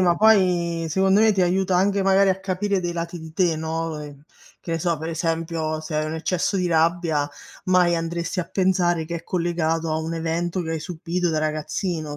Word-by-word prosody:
ma 175 Hz, -2 st, +3 dB
poi 180 Hz, -6 st, +3 dB
secondo 190 Hz, +5 st, +3 dB
me 220 Hz, 0 st, +5 dB
ti 195 Hz, -3 st, +2 dB
aiuta 185 Hz, +1 st, +2 dB
anche 195 Hz, +2 st, +2 dB
magari 195 Hz, 0 st, +4 dB
a 190 Hz, 0 st, -1 dB
capire 195 Hz, +1 st, -1 dB
dei 175 Hz, -1 st, -3 dB
lati 170 Hz, +1 st, -4 dB
di 160 Hz, 0 st, -10 dB
te, 175 Hz, -3 st, +2 dB
no, 160 Hz, 0 st, -3 dB
ehm, 145 Hz, -1 st, -10 dB, 0.4 s
che -, -, -7 dB
ne 165 Hz, -, 0 dB
so, 170 Hz, -1 st, 0 dB
per 160 Hz, +2 st, -5 dB
esempio 165 Hz, -1 st, -2 dB
se 155 Hz, 0 st, -6 dB
hai 155 Hz, -, 0 dB
un 155 Hz, -, -4 dB
eccesso 180 Hz, +4 st, -1 dB
di 180 Hz, -1 st, 0 dB
rabbia, 165 Hz, -3 st, +1 dB, 0.4 s
mai 180 Hz, -2 st, +4 dB
andresti 170 Hz, +2 st, -2 dB
a -, -, -3 dB
pensare 180 Hz, -3 st, +1 dB
che 170 Hz, +2 st, -4 dB
è 165 Hz, -, -9 dB
collegato 165 Hz, -2 st, -1 dB
a 155 Hz, -, 0 dB
un 160 Hz, +1 st, -3 dB
evento 170 Hz, +2 st, -2 dB
che 160 Hz, -, -5 dB
hai 160 Hz, -1 st, -2 dB
subito 175 Hz, +1 st, -2 dB
da 160 Hz, -, -1 dB
ragazzino, 155 Hz, 0 st, -2 dB
170 Hz, 205 wpm, -23 LUFS, 160-185 Hz, 0.4 s, me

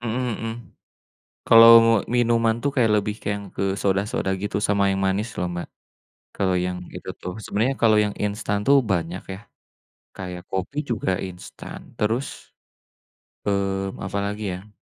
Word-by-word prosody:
Mhm 120 Hz, +1 st, -2 dB
mhm. 115 Hz, -, -3 dB, 1.0 s
Kalau 115 Hz, 0 st, +9 dB, 0.2 s
mo 115 Hz, -, +5 dB, 0.2 s
minuman 115 Hz, -2 st, +2 dB
tuh 140 Hz, -, +1 dB
kayak 115 Hz, -4 st, +3 dB
lebih 105 Hz, +1 st, -2 dB
ke -, -, -16 dB
yang 100 Hz, -1 st, -8 dB
ke -, -, -3 dB, 0.2 s
soda-soda 100 Hz, 0 st, 0 dB
gitu 105 Hz, -, -2 dB
sama 100 Hz, -1 st, +2 dB
yang 95 Hz, -, -1 dB
manis 100 Hz, +4 st, 0 dB
loh, 90 Hz, -, 0 dB
Mbak. 85 Hz, -, -5 dB, 0.7 s
Kalau 95 Hz, -2 st, +1 dB
yang 90 Hz, 0 st, -3 dB, 0.2 s
itu -, -, -9 dB
tuh. 90 Hz, 0 st, -5 dB
Sebenarnya 120 Hz, +6 st, 0 dB
kalau 110 Hz, -2 st, +5 dB
yang 105 Hz, -, -3 dB
instan 100 Hz, 0 st, -1 dB
tuh 140 Hz, 0 st, +6 dB
banyak 85 Hz, 0 st, -1 dB
ya. -, -, -9 dB, 0.8 s
Kayak 90 Hz, -2 st, -6 dB
kopi 95 Hz, +10 st, -3 dB
juga 110 Hz, -4 st, -1 dB, 0.2 s
instan. 90 Hz, 0 st, -10 dB, 0.2 s
Terus, 115 Hz, +6 st, 0 dB, 1.2 s
mmm, 95 Hz, -1 st, -1 dB
apalagi 100 Hz, +2 st, -3 dB
ya? 100 Hz, +2 st, -16 dB
100 Hz, 150 wpm, -23 LUFS, 95-115 Hz, 1.2 s, Kalau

